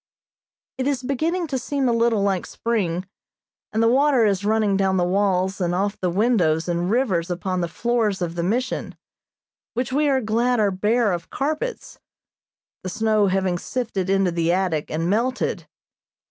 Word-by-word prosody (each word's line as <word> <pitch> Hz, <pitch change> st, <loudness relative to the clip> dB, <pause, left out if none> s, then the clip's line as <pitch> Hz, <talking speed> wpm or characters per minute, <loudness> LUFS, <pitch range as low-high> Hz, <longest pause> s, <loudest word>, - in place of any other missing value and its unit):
It 260 Hz, -, 0 dB
is 270 Hz, -3 st, -1 dB
beginning 320 Hz, +7 st, -1 dB
to 270 Hz, -4 st, -2 dB
seem 275 Hz, +1 st, -1 dB
a 240 Hz, -, +2 dB
little 230 Hz, -3 st, +2 dB
like 195 Hz, -3 st, 0 dB
spring, 190 Hz, -6 st, -2 dB, 0.7 s
and 220 Hz, +1 st, +1 dB
the -, -, +4 dB
water 265 Hz, -1 st, +4 dB
is 200 Hz, -2 st, +1 dB
running 215 Hz, -1 st, +2 dB
down 190 Hz, -1 st, +1 dB
the 180 Hz, -, +2 dB
walls 190 Hz, 0 st, +1 dB
and 175 Hz, 0 st, 0 dB
off 200 Hz, +2 st, 0 dB
the 180 Hz, -, 0 dB
windows 180 Hz, -5 st, +2 dB
in 175 Hz, +1 st, -1 dB
rivers 195 Hz, -8 st, +1 dB
upon 180 Hz, +1 st, -2 dB
the 170 Hz, -, -1 dB
floors 225 Hz, +2 st, 0 dB
of 175 Hz, -2 st, -2 dB
the 170 Hz, -, -3 dB
Mission, 235 Hz, +9 st, -2 dB, 0.8 s
which 250 Hz, +1 st, -2 dB
we 295 Hz, +1 st, +2 dB
are 270 Hz, -1 st, +3 dB
glad 235 Hz, +2 st, +1 dB
are 205 Hz, -2 st, +3 dB
bare 210 Hz, +3 st, +1 dB
of 170 Hz, -2 st, -4 dB
carpets; 310 Hz, -, -3 dB, 0.8 s
the 185 Hz, -, -5 dB
snow 215 Hz, +1 st, +2 dB
having 185 Hz, -2 st, 0 dB
sifted 210 Hz, -7 st, -3 dB
into 195 Hz, -2 st, +2 dB
the 170 Hz, 0 st, +1 dB
attic 180 Hz, -4 st, 0 dB
and 165 Hz, +2 st, -2 dB
melted. 235 Hz, +7 st, -1 dB
205 Hz, 170 wpm, -23 LUFS, 180-245 Hz, 0.8 s, the